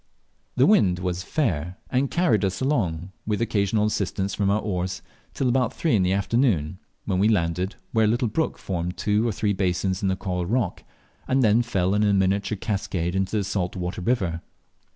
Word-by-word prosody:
The 130 - +5
wind 100 - +4
was 90 0 -2
fair, 90 - -1
and 130 +2 +1
carried 130 - +2
us 95 -1 -1
along, 95 - -1 0.2
with 105 -2 0
occasional 105 -2 +1
assistance 100 -2 -1
from 100 -2 0
our 100 +2 +2
oars, 95 -3 -3 0.3
till 135 - 0
about 125 -1 +1
three 160 -7 +1
in 100 - +3
the 90 0 +2
afternoon, 95 - +1 0.3
when 95 -3 0
we 100 - +4
landed 90 -1 0 0.2
where 110 -1 +3
a - - +3
little 120 +3 +1
brook 160 +9 -1
formed 90 -1 -4
two 105 +2 +1
or - - +1
three 105 0 0
basins 95 0 0
in 100 - 0
the 95 - +1
coral 90 -2 -3
rock, 115 -3 -1 0.4
and 130 0 +2
then 110 +1 +4
fell 95 -6 0
in 105 - +2
a 105 -1 +3
miniature 100 +2 +1
cascade 95 -4 -2
into 95 +2 0
the 105 - 0
salt 95 -2 -2
water 90 0 -4
river. 90 -6 0
100 Hz, 195 wpm, -24 LUFS, 90-110 Hz, 0.4 s, The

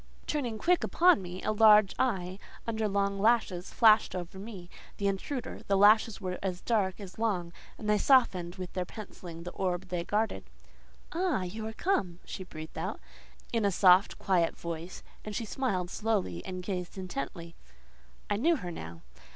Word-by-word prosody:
Turning 250 -7 -2
quick 350 +9 +2
upon 355 - +4
me, 180 0 -7
a - - +1
large 215 -2 +6
eye, 190 -6 0 0.3
under 220 -1 -1
long 200 0 0
lashes, 205 -5 +2
flashed 220 -3 +5
over 180 +1 -6
me, 195 -4 -8 0.3
the 200 - -3
intruder: 220 +7 -3
the 195 - +3
lashes 215 +2 +5
were 185 -3 -4
as 185 -2 -2
dark 200 -4 0
as 195 0 -10
long, 180 -7 -1 0.2
and 215 - -7
they 210 0 +3
softened 190 -11 +3
with 185 -2 -7
their 185 - -1
pencilling 175 -4 -9
the 175 - -6
orb 185 0 -2
they 175 -1 -2
guarded. 215 +5 -1 0.7
"Ah! 345 - 0
you 215 +5 -5
are 220 - -6
come!" 205 - 0
she 190 - -6
breathed 155 -3 -9
out, 185 +6 -3 0.5
in 230 -2 +1
a 200 - +4
soft, 185 +1 +5
quiet 180 -4 +1
voice, 170 +1 -6 0.2
and 210 -1 -6
she 230 - -2
smiled 195 -7 -2
slowly, 200 - -1
and 185 -1 -5
gazed 180 -1 -4
intently. 170 -2 -5 0.7
I 205 - 0
knew 330 +10 +3
her 180 - -5
now. 80 - -8
195 Hz, 170 wpm, -30 LUFS, 180-220 Hz, 0.7 s, large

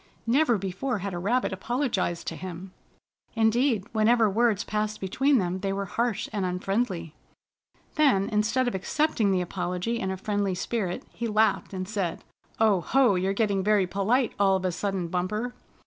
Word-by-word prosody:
Never 245 0 +3
before 195 +7 -2
had 200 0 -4
a 175 - -3
rabbit 230 +5 0
apologized 195 -4 -1
to 165 - -7
him. 185 +2 -7 0.6
Indeed, 225 -1 +2
whenever 225 +1 +4
words 215 0 +2
passed 215 0 -2
between 265 +9 +2
them, 185 -3 -1
they 195 0 -2
were 200 0 -2
harsh 230 +2 -1
and 205 -2 -1
unfriendly. 180 -2 -2 0.8
Then, 265 -11 +3
instead 220 +4 +1
of 245 - -1
accepting 225 +2 +1
the 185 -1 +2
apology 180 +5 -2
in 190 - -2
a 190 - -3
friendly 200 -1 -1
spirit, 185 -1 -2
he 235 - -4
laughed, 215 -1 +2
and 185 -1 -4
said: 195 -5 -3 0.4
"Oh! 210 -5 +4
Ho! 260 +2 +3
You're 190 +1 0
getting 200 -2 +1
very 205 -1 +3
polite 200 +8 +1
all 195 -1 +4
of 190 0 -2
a 185 - +1
sudden, 190 0 -2
Bumper! 210 +8 -2
200 Hz, 165 wpm, -27 LUFS, 185-230 Hz, 0.8 s, whenever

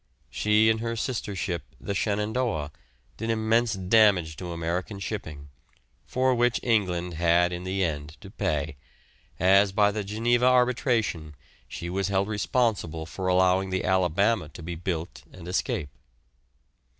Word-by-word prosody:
She 105 +1 +3
and 110 - -1
her 115 0 -3
sister 110 -3 -3
ship, 90 -3 -2 0.2
the 100 - -4
"Shenandoah," 105 - -1 0.5
did 115 +1 -4
immense 115 +1 +2
damage 95 -4 +3
to 90 -2 -6
American 85 +4 -3
shipping, 80 -8 -6 0.6
for 130 0 +2
which 120 -1 +2
England 90 -7 0
had 85 +1 +2
in 90 +1 -5
the 95 +1 -1
end 75 -2 -3
to 100 -3 -11
pay, 75 -8 -2 0.6
as 95 +2 +5
by 105 +1 +3
the 105 0 -3
Geneva 115 +4 +1
arbitration 120 - +1 0.3
she 85 - -6
was 95 +2 -1
held 100 +1 0
responsible 105 -7 0
for 95 +3 -5
allowing 95 +1 +3
the 95 0 -1
"Alabama" 95 +1 +2
to 80 +2 -11
be 85 +2 -5
built 85 0 -4
and 90 -2 -11
escape. 90 - -2
95 Hz, 140 wpm, -26 LUFS, 85-110 Hz, 0.6 s, as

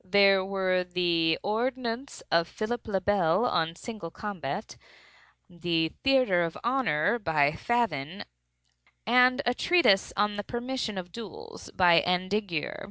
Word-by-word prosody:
There 195 0 +4
were 190 -1 0
the 175 -2 +1
"Ordonnance 240 +4 -3
of 170 0 +3
Philip 225 +4 -4
le 195 -3 0
Bel 190 +1 +2
on 165 -7 0
Single 210 -3 -8
Combat"; 195 -1 -6 0.7
the 170 -2 -1
"Theatre 255 -10 +3
of 165 -1 -2
Honor," 240 - +1
by 155 -7 +2
Favyn, 185 - -2 0.8
and 250 +4 +4
a 245 - +2
treatise 250 - +3
"On 205 0 +1
the 205 - -3
Permission 240 -2 -4
of 180 -1 -6
Duels," 445 - -10
by 175 -2 +5
Andiguier. 185 -1 -2
195 Hz, 125 wpm, -27 LUFS, 175-240 Hz, 0.8 s, by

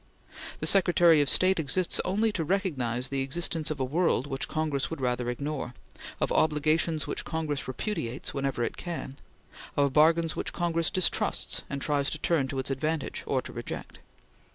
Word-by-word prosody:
The - - -1
Secretary 175 -4 +6
of 145 - +2
State 185 +4 +3
exists 170 +4 +1
only 215 +4 +1
to 175 -5 -2
recognize 135 - -1
the 135 -1 -1
existence 160 +3 -1
of 155 -2 -3
a - - +1
world 155 -1 +1
which 135 -1 -3
Congress 155 -3 -1
would 165 - -5
rather 125 -1 -1
ignore; 135 0 -4 0.4
of - - 0
obligations 155 +1 +2
which - - -3
Congress 155 -3 -3
repudiates 130 - -4
whenever 135 -3 -1
it - - -3
can; 165 -6 -5 0.6
of 140 -2 +3
bargains 160 +2 +4
which - - -3
Congress 170 -2 +1
distrusts 185 -2 0
and 140 -1 -4
tries 145 -2 +1
to - - -3
turn 155 -3 +1
to 135 - -5
its 130 +1 -1
advantage 155 +3 -2
or - - 0
to - - -8
reject. - - -6
150 Hz, 170 wpm, -28 LUFS, 135-170 Hz, 0.6 s, Secretary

